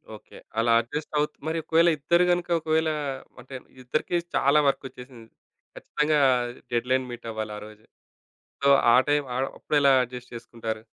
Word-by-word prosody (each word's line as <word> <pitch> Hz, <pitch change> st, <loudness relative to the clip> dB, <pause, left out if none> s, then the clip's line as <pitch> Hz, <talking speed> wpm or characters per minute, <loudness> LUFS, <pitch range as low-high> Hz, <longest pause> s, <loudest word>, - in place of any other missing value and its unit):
Okay. -, -, -15 dB, 0.2 s
అలా 115 Hz, 0 st, +2 dB
adjust 150 Hz, +7 st, -7 dB
అవుతు 150 Hz, -, -1 dB
మరి 160 Hz, +1 st, -1 dB
ఒకవేళ 165 Hz, +2 st, +3 dB
ఇద్దరు 170 Hz, +5 st, +2 dB
గనుక 175 Hz, 0 st, -1 dB
ఒకవేళ 160 Hz, 0 st, 0 dB, 0.5 s
అంటే 130 Hz, +2 st, -11 dB, 0.3 s
ఇద్దరికీ 155 Hz, +7 st, -2 dB, 0.2 s
చాలా 140 Hz, +2 st, +4 dB
వర్క్ 135 Hz, -, 0 dB
వచ్చేసింది. 125 Hz, -3 st, -13 dB, 0.5 s
ఖచ్చితంగా 150 Hz, 0 st, 0 dB, 0.5 s
డెడ్‌లైన్ 125 Hz, +2 st, 0 dB
మీటవ్వాలి 110 Hz, -3 st, -6 dB
ఆరోజే. 105 Hz, +1 st, -13 dB, 0.8 s
సో, 140 Hz, -, +3 dB, 0.3 s
ఆ -, -, +7 dB
టైం 145 Hz, 0 st, +2 dB, 0.4 s
అప్పుడు 150 Hz, -, -2 dB
ఎలా 140 Hz, -1 st, +5 dB
అడ్జస్ట్ 125 Hz, 0 st, -11 dB
చేసుకుంటారు? 115 Hz, -1 st, -6 dB
130 Hz, 135 wpm, -25 LUFS, 115-150 Hz, 0.8 s, ఆ